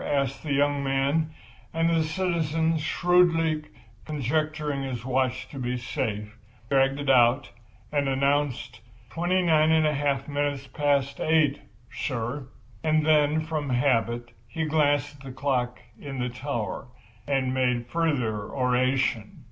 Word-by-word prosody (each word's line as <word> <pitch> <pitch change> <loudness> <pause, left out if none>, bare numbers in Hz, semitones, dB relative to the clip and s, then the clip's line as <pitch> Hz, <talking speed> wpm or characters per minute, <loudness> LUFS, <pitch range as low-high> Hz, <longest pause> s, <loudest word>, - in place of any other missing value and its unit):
asked 140 -2 -1
the 155 - -5
young 145 0 +2
man; 140 +4 +1 0.5
and 165 0 +2
the 165 -1 +3
citizen, 165 -1 0
shrewdly 165 -1 +2 0.4
conjecturing 150 0 -1
his 125 -3 -4
watch 130 -1 0
to 140 - -9
be 125 0 -2
safe, 105 -2 -4 0.4
dragged 135 0 +3
it 145 - -4
out 130 +1 +4 0.4
and 145 -2 +1
announced: 140 -3 0 0.3
"Twenty 175 +7 +1
nine 155 -2 +4
and 160 -1 +4
a 150 - +2
half 140 -1 0
minutes 145 -1 -2
past 140 -1 0
eight, 155 -3 +2 0.3
sir." 125 +1 -3 0.4
And 155 -1 +2
then, 155 0 +3
from 155 -3 -3
habit, 120 -2 +1 0.2
he 160 +7 -3
glanced 145 -2 +1
at - - -19
the 135 - -7
clock 125 -2 -1 0.2
in 140 -2 -7
the 125 0 -1
tower, 125 -2 -4 0.4
and 135 -2 0
made 125 -2 +1
further 125 -9 -1
oration. 125 -3 0
140 Hz, 135 wpm, -26 LUFS, 130-155 Hz, 0.5 s, out